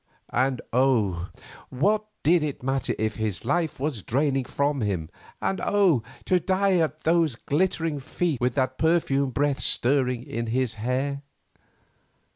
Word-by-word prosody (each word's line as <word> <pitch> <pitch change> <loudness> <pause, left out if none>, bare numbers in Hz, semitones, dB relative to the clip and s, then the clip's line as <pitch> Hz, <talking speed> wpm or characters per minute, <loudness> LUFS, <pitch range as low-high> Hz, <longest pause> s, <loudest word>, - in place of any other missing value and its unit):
And 130 0 +1
oh! 110 -9 +2 0.4
what 205 +11 +1 0.2
did 170 +3 +4
it 145 -4 -4
matter 135 +1 -1
if 110 0 -2
his 110 -3 -2
life 160 +2 0
was 135 -6 -2
draining 135 +4 0
from 140 0 -1
him, 90 -7 -2 0.3
and 195 - -1
oh! 190 - +3 0.2
to 185 - +3
die 190 +2 +2
at 155 -2 -1
those 165 -5 +2
glittering 160 +2 -1
feet, 150 0 -2
with 125 0 +1
that 130 -1 -1
perfumed 140 -5 +1
breath 145 -1 +1
stirring 125 -2 +2
in 120 -4 -4
his 125 0 0
hair! 135 +4 -1
135 Hz, 140 wpm, -25 LUFS, 125-160 Hz, 0.4 s, did